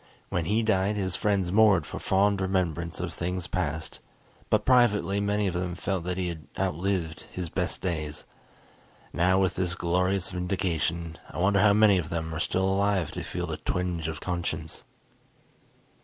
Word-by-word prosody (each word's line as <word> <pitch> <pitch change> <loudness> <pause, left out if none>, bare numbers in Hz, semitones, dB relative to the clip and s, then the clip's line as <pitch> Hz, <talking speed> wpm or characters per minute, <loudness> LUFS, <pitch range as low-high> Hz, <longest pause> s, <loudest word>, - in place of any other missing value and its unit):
When 85 - -1
he 110 +7 +1
died 105 -1 +2
his 95 -3 -1
friends 100 -4 +1
mourned 105 -3 +5
for - - -6
fond 100 +1 +2
remembrance 85 -3 -1
of - - -3
things 90 +1 -3
past, 80 -4 -3 0.5
but - - +2
privately 115 -6 +4
many 105 0 +1
of 95 - 0
them 90 -1 -2
felt 95 -1 -2
that 90 0 -2
he 90 -1 -1
had 80 -3 -8
outlived 85 -1 -1
his 90 -2 -4
best 90 +1 -2
days. 80 -5 -3 0.9
Now 90 +2 +3
with 95 -1 +2
this 90 -2 -1
glorious 90 +2 0
vindication, 85 -3 -2
I - - -9
wonder 100 +3 +3
how 105 -1 +6
many 105 -2 +5
of 80 -2 -4
them 80 -1 -3
are 80 - -3
still 95 +3 +1
alive 95 -3 +1
to - - -5
feel 90 0 -3
the 80 -2 -4
twinge 90 -3 -2
of 80 -1 -4
conscience.... 85 -3 -4
90 Hz, 170 wpm, -27 LUFS, 85-95 Hz, 0.9 s, how